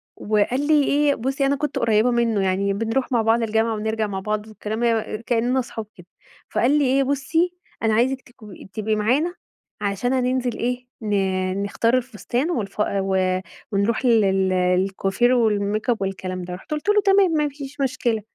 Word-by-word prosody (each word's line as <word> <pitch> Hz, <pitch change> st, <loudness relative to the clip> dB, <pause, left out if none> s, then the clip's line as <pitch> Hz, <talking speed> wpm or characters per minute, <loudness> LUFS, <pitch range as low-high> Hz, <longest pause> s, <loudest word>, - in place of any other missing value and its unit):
وقال 220 Hz, +7 st, 0 dB
لي 300 Hz, -2 st, +5 dB
إيه 285 Hz, 0 st, +2 dB
بُصي 270 Hz, +4 st, -1 dB
أنا 280 Hz, +1 st, +2 dB
كنت 290 Hz, 0 st, -2 dB
قريبة 225 Hz, +1 st, +3 dB
منه 235 Hz, -3 st, +1 dB
يعني 195 Hz, +1 st, +1 dB
بنروح 225 Hz, +6 st, -1 dB
مع 235 Hz, -3 st, +3 dB
بعض 225 Hz, +1 st, +2 dB
الجامعة 225 Hz, +1 st, +1 dB
ونرجع 220 Hz, 0 st, -1 dB
مع 195 Hz, -2 st, -4 dB
بعض 210 Hz, +2 st, -3 dB
وكلام 215 Hz, +1 st, -5 dB
مي 225 Hz, -2 st, 0 dB
كإننا 240 Hz, +3 st, 0 dB
أصحاب 230 Hz, -3 st, -5 dB
كده 175 Hz, -1 st, -15 dB, 0.4 s
فقال 250 Hz, +4 st, +2 dB
لي 290 Hz, -, +3 dB
إيه 270 Hz, +2 st, +3 dB
"بُصي 305 Hz, +6 st, 0 dB, 0.3 s
أنا 220 Hz, -, +3 dB
عايزك 255 Hz, +4 st, +1 dB
تكو 215 Hz, -5 st, -15 dB, 0.2 s
تبقي 215 Hz, 0 st, -1 dB
معانا 260 Hz, +12 st, +1 dB, 0.5 s
عشان 205 Hz, +5 st, -1 dB
هننزل 255 Hz, -1 st, 0 dB
إيه 250 Hz, +1 st, -2 dB
ن 190 Hz, -2 st, 0 dB
نختار 230 Hz, +4 st, +1 dB
الفستان 250 Hz, -, -2 dB
والف 205 Hz, -, -3 dB
و 190 Hz, -2 st, +1 dB, 0.3 s
ونروح 210 Hz, +5 st, 0 dB
لل 195 Hz, -5 st, +3 dB
للكوافير 190 Hz, +5 st, +1 dB
والميك 215 Hz, -1 st, +1 dB
أب 235 Hz, -, +3 dB
والكلام 190 Hz, -1 st, -3 dB
ده." 180 Hz, 0 st, -6 dB
رُحت 185 Hz, +10 st, -11 dB
قُلت 305 Hz, +7 st, -2 dB
له 420 Hz, 0 st, +5 dB
"تمام 390 Hz, -2 st, +5 dB
ما 300 Hz, -2 st, +1 dB
فيش 280 Hz, 0 st, -8 dB
مشكلة." 245 Hz, -4 st, 0 dB
225 Hz, 170 wpm, -22 LUFS, 200-260 Hz, 0.5 s, لي